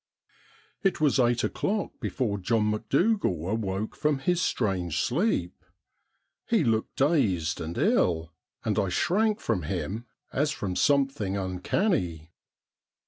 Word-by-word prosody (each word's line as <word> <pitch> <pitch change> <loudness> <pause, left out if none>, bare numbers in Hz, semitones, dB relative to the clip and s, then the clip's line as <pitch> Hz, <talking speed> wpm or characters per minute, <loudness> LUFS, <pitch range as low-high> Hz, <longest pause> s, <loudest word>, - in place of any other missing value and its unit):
It 195 -3 +1
was 145 -3 +3
eight 120 -1 +3
o'clock 205 +1 -1
before 105 -6 -2
John 105 +2 +1
Macdougal 135 - +1 0.2
a^oke 105 -1 -3
from 150 -1 +1
his 175 +6 0
strange 95 - 0
sleep. 130 - 0 0.8
He 225 -7 +3
looked 110 -3 0
dazed 100 - +1
and 80 +1 -5
ill, 80 -1 +2 0.3
and - - +1
I 95 - +1
shrank 210 - +1
from 110 - -1
him 95 +8 -4 0.3
as 145 +2 +1
from 100 -11 -3
something 135 -9 +1
uncanny. 90 - -1
115 Hz, 120 wpm, -27 LUFS, 90-150 Hz, 0.8 s, was